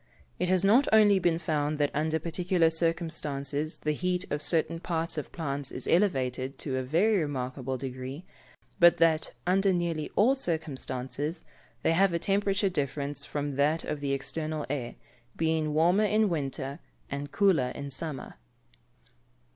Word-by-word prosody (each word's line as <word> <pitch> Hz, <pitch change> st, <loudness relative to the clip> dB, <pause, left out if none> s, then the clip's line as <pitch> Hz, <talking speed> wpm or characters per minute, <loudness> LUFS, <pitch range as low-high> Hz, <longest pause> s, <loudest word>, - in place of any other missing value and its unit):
It 180 Hz, -, 0 dB
has 185 Hz, +1 st, +3 dB
not 235 Hz, +8 st, +5 dB
only 210 Hz, -3 st, +6 dB
been 175 Hz, -2 st, +2 dB
found 155 Hz, -2 st, -1 dB
that 145 Hz, -1 st, +1 dB
under 155 Hz, +2 st, 0 dB
particular 170 Hz, +1 st, +1 dB
circumstances 155 Hz, -3 st, -1 dB
the 150 Hz, -, -1 dB
heat 180 Hz, +4 st, -1 dB
of 145 Hz, -, -1 dB
certain 165 Hz, +1 st, +1 dB
parts 165 Hz, -1 st, -1 dB
of 150 Hz, -, -5 dB
plants 140 Hz, -4 st, -3 dB
is 125 Hz, -, -6 dB
elevated 135 Hz, -8 st, +1 dB
to 135 Hz, -3 st, -3 dB
a -, -, 0 dB
very 180 Hz, +11 st, +2 dB
remarkable 130 Hz, -3 st, -3 dB
degree, 130 Hz, +5 st, -6 dB, 0.5 s
but 175 Hz, -1 st, +7 dB
that, 160 Hz, -1 st, +2 dB
under 195 Hz, +2 st, +3 dB
nearly 170 Hz, -4 st, -1 dB
all 235 Hz, +6 st, +5 dB
circumstances, 150 Hz, -, -3 dB, 0.4 s
they -, -, +3 dB
have 190 Hz, +1 st, +3 dB
a -, -, +2 dB
temperature 195 Hz, +2 st, +1 dB
different 145 Hz, -4 st, -2 dB
from 145 Hz, +1 st, -1 dB
that 145 Hz, +4 st, +1 dB
of 150 Hz, -, -3 dB
the 140 Hz, -1 st, -2 dB
external 155 Hz, +2 st, -2 dB
air, 125 Hz, -5 st, -3 dB, 0.4 s
being 160 Hz, -1 st, +1 dB
warmer 175 Hz, +7 st, +3 dB
in 215 Hz, 0 st, +2 dB
winter, 140 Hz, -2 st, -3 dB, 0.3 s
and 140 Hz, +1 st, -4 dB
cooler 185 Hz, -11 st, +3 dB
in 140 Hz, 0 st, -6 dB
summer. 145 Hz, -, -3 dB
155 Hz, 150 wpm, -28 LUFS, 140-175 Hz, 0.5 s, but